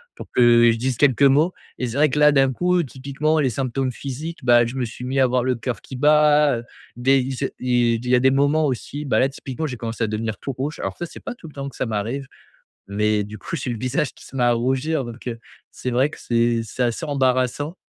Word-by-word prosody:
pour - - -9
que, 125 - +4
heu, 120 -1 +6
je 115 - -1
dise 125 0 -1
quelques 140 -1 +3
mots 150 +6 +4 0.3
et 125 - -1
c'est 120 +4 -5
vrai 150 +1 +5
que 150 - -3
là 150 0 +7
d'un 135 -2 +3
coup 180 +4 +2
typiquement 140 +4 -1
les 135 -3 +2
symptômes 130 +1 -2
physiques 145 +6 -6
bah 120 -1 +5
je 120 +3 -5
me 130 -2 -1
suis 120 +2 -9
mis 135 +1 -1
à - - +6
avoir 125 0 +1
le 130 -1 +1
coeur 120 +1 -4
qui 130 - -9
bat, 150 -1 +4
heu, 115 - -7 0.3
des 135 +3 +3
il 130 +1 -3
c'est 135 - -3
il 120 -2 +2
il - - -3
y 125 - +5
a - - +4
des 130 +1 +4
moments 145 +3 +2
aussi 145 +3 -4
bah 135 - +1
là 135 - +4
typiquement 135 +2 -6
j'ai 125 - -5
commencé 115 0 -4
à - - +1
devenir 110 -1 -3
tout 135 - -5
rouge 140 +5 -4
alors - - -3
ça 175 - -4
c'est - - -11
pas - - -6
tout 165 - -12
le 150 - -13
temps 140 0 -5
que - - -16
ça - - -2
m'arrive 115 +6 -3 0.6
mais 105 +1 +1
du 110 +1 -9
coup 135 - -6
j'ai 130 -1 -4
eu - - -1
le 110 - -6
visage 130 +4 -1
qui - - -16
se - - -15
met 125 - +1
à 120 0 +4
rougir 135 +5 0
donc, 120 +1 -9
heu, 115 -1 -3 0.3
c'est 125 - -4
vrai 130 +4 +2
que - - -11
c'est 115 -1 +1
c'est 125 +3 -3
assez 120 +7 -1
embarrassant. 135 +3 0
130 Hz, 270 wpm, -22 LUFS, 120-140 Hz, 0.6 s, là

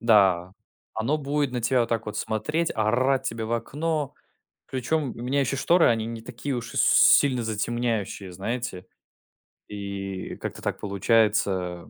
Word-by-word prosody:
Да, 95 -6 +4 0.4
оно 115 +8 0
будет 145 -1 -1
на 125 - -2
тебя 125 +2 +3
вот 115 - 0
так 115 -1 -1
вот 105 - -5
смотреть, 150 +10 -1
орать 130 +5 +2
тебе 115 0 -3
в 115 - -3
окно. 150 +4 -2 0.5
Причем 135 +2 -1
у 115 - -7
меня 135 +3 +1
еще 140 +1 0
шторы, 170 +5 +4
они 115 -1 +1
не 115 -1 -6
такие 140 +3 -5
уж 115 0 -6
и - - -1
с - - +5
сильно 130 -4 +5
затемняющие, 110 -3 -2
знаете. 95 -1 -4 0.8
И 100 -2 -5
как-то - - -6
так - - -3
получается 100 -4 +1
115 Hz, 155 wpm, -25 LUFS, 105-130 Hz, 0.8 s, с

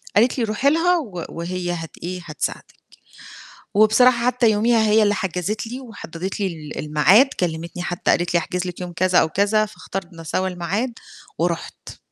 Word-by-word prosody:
قالت 240 +5 +4
لي: 240 - +1
"روحي 225 +5 +2
لها 345 +4 +3
و 195 - -5
وهي 175 +1 -4
هت 165 -3 -5
إيه 180 +1 -4
هتساعدِك." 155 -2 -5 0.9
وبصراحة 235 +3 +5
حتى 250 -2 +3
يوميها 225 +2 +3
هي 215 +1 +4
اللي 205 -1 +3
حجزِت 190 +3 -2
لي، 245 +3 -6
وحدّدِت 195 -6 -7
لي 200 - +1
ال 155 -5 -6
الميعاد 155 - +5
كلمتني 170 0 -3
حتى 175 0 -1
قالت 175 0 +1
لي - - +6
أحجز 180 +2 -3
لِك 180 0 -6
يوم 180 -1 -5
كذا 185 +1 +2
أو 160 - +4
كذا، 205 +4 +2
فاختارنا 180 -5 -8
سوا 185 +4 -1
الميعاد 185 +8 -2 0.5
ورُحت. 170 0 -3
185 Hz, 170 wpm, -21 LUFS, 175-220 Hz, 0.9 s, لي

